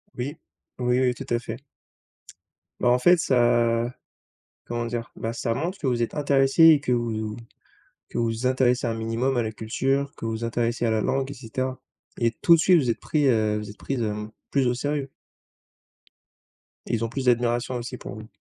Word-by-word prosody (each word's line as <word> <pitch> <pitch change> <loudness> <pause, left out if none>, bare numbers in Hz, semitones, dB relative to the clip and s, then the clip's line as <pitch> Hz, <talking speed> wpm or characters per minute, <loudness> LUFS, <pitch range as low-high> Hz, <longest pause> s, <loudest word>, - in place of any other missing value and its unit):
Oui, 140 +5 -4 0.4
oui, 125 0 +1
oui 125 -1 +2
tout - - -7
à 120 - +2
fait. 115 +3 -7 1.2
Bah 120 - +3
en 125 +1 +4
fait 175 +6 +6
ça 120 -3 +2 0.7
comment 120 0 -3
dire? 115 0 -4
Bah 115 - -3
ça 115 0 -2
montre 175 +9 -3
que - - -4
vous 120 -2 +1
êtes 115 - -2
intéressée 140 +2 +4
et 155 -3 +7
que 125 - -1
vous 120 -1 0
vous 110 0 -4 0.7
que - - -6
vous 115 +1 -1
intéressez 125 -1 +2
un 115 - 0
minimum 115 +4 -1
à 120 - +2
la 110 - -3
culture, 135 +6 -1
que - - -7
vous 110 0 -3
intéressez 115 +1 -1
à 115 - +2
la 110 - +1
langue, 135 +3 -1
et - - -5
cetera. 130 +1 -4 0.4
Et 115 -1 +2
tout 170 - +6
de 165 - -1
suite 180 +1 +5
vous 130 -5 0
êtes 115 - 0
pris 150 -3 +1
heu, 110 -3 +2
vous 105 -1 -6
êtes 105 - -11
prise, 135 -3 -3
hem, 105 0 -3 0.2
plus 135 -3 +2
au 120 - +2
sérieux. 140 +2 -2 1.8
Et - - -3
ils 115 - -2
ont 115 - -4
plus 130 +1 -4
d'admiration 120 0 +1
aussi 120 +1 -5
pour 100 - -8
vous. 110 0 -9
120 Hz, 200 wpm, -25 LUFS, 115-135 Hz, 1.8 s, et